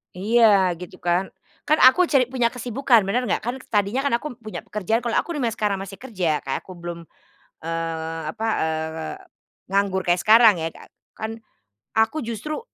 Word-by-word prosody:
Iya 205 Hz, -2 st, +4 dB
gitu 180 Hz, -, -9 dB
kan, 175 Hz, +2 st, +1 dB, 0.4 s
kan 310 Hz, -, +4 dB
aku 345 Hz, +8 st, +7 dB
cari 275 Hz, -5 st, +4 dB
punya 245 Hz, -3 st, +2 dB
kesibukan 245 Hz, -1 st, +2 dB
bener 245 Hz, +6 st, -1 dB
nggak? -, -, 0 dB
Kan 240 Hz, +3 st, -2 dB
s -, -, -17 dB
tadinya 205 Hz, +4 st, 0 dB
kan 280 Hz, -, +1 dB
aku 250 Hz, 0 st, -5 dB
punya 215 Hz, -2 st, -7 dB
pekerjaan 215 Hz, +3 st, -1 dB
kalau 235 Hz, -, 0 dB
aku 340 Hz, -, -4 dB
remind 245 Hz, -6 st, 0 dB
sekarang 210 Hz, -2 st, -1 dB
masih 195 Hz, 0 st, -10 dB
kerja 185 Hz, -, -1 dB
kayak 135 Hz, -, -3 dB
aku -, -, -12 dB
belum, 170 Hz, 0 st, -6 dB, 0.7 s
eee, 165 Hz, 0 st, -3 dB, 0.2 s
apa, 225 Hz, -, -2 dB
eee, 160 Hz, 0 st, -3 dB, 0.6 s
nganggur 195 Hz, -2 st, +1 dB
kayak 175 Hz, 0 st, +2 dB
sekarang 220 Hz, -5 st, +6 dB
ya 160 Hz, -, -1 dB
Kak, -, -, -14 dB, 0.3 s
kan, 220 Hz, 0 st, -4 dB, 0.7 s
aku 225 Hz, +8 st, +2 dB
justru 235 Hz, +7 st, -4 dB
210 Hz, 175 wpm, -23 LUFS, 175-240 Hz, 0.7 s, aku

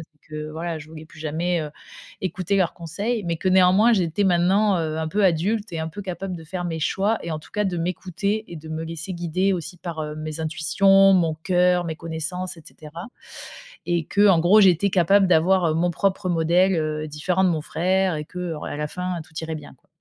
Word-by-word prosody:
et -, -, -35 dB
que 155 Hz, 0 st, -6 dB
voilà, 165 Hz, +1 st, -4 dB
je 150 Hz, -, -11 dB
voulais 160 Hz, 0 st, -11 dB
plus 160 Hz, -, -16 dB
jamais, 165 Hz, +3 st, -1 dB
heu, 150 Hz, -, -5 dB, 0.5 s
écouter 185 Hz, +1 st, -1 dB
leurs 185 Hz, -3 st, +1 dB
conseils. 200 Hz, +7 st, -3 dB
Mais 170 Hz, -1 st, -1 dB
que 185 Hz, +3 st, -1 dB
néanmoins, 190 Hz, +5 st, +5 dB
j'étais 185 Hz, -2 st, +1 dB
maintenant, 190 Hz, +2 st, +3 dB
heu, 155 Hz, -1 st, -2 dB
un 160 Hz, 0 st, -2 dB
peu 205 Hz, +2 st, +2 dB
adulte 190 Hz, +4 st, 0 dB
et 165 Hz, -, -3 dB
un 160 Hz, 0 st, -3 dB
peu 185 Hz, +6 st, -8 dB
capable 185 Hz, -1 st, -5 dB
de 165 Hz, -, -11 dB
faire 180 Hz, +2 st, -5 dB
mes 165 Hz, -2 st, -3 dB
choix 200 Hz, +8 st, 0 dB
et 170 Hz, -, -5 dB
en 155 Hz, -, -3 dB
tout -, -, -18 dB
cas 210 Hz, -2 st, 0 dB
de 185 Hz, -, -1 dB
m'écouter 190 Hz, +5 st, -2 dB
et 170 Hz, -, -9 dB
de 160 Hz, 0 st, -10 dB
me 160 Hz, +1 st, -4 dB
laisser 165 Hz, +3 st, -6 dB
guider 175 Hz, +3 st, 0 dB
aussi 180 Hz, -1 st, -4 dB
par, 170 Hz, -2 st, -6 dB
heu, 150 Hz, 0 st, -5 dB
mes 155 Hz, 0 st, -6 dB
intuitions, 195 Hz, +5 st, +4 dB
mon 170 Hz, -4 st, +2 dB
cœur, 180 Hz, +2 st, +2 dB
mes 160 Hz, -1 st, -4 dB
connaissances 165 Hz, +3 st, -5 dB
et -, -, -12 dB
cetera 155 Hz, +4 st, -10 dB, 0.8 s
et 170 Hz, -2 st, 0 dB
qu'en 200 Hz, -2 st, +4 dB
gros, 185 Hz, +6 st, +5 dB
j'étais 190 Hz, 0 st, +4 dB
capable 190 Hz, +2 st, +4 dB
d'avoir, 180 Hz, +1 st, +3 dB
heu, -, -, +1 dB
mon 175 Hz, +2 st, +1 dB
propre 190 Hz, +1 st, -1 dB
modèle, 175 Hz, +3 st, +3 dB
heu, 155 Hz, -1 st, -2 dB
différent 170 Hz, +5 st, -1 dB
de 185 Hz, -, +4 dB
mon 160 Hz, -3 st, -1 dB
frère 185 Hz, +2 st, 0 dB
et 150 Hz, -, -5 dB
que 180 Hz, 0 st, -5 dB
en 150 Hz, -, -8 dB
à -, -, -5 dB
la 150 Hz, 0 st, -3 dB
fin, 180 Hz, +1 st, -4 dB
tout 160 Hz, -, -23 dB
irait 160 Hz, 0 st, -4 dB
bien, 150 Hz, -2 st, -10 dB
quoi. -, -, -38 dB
175 Hz, 225 wpm, -23 LUFS, 160-190 Hz, 0.8 s, néanmoins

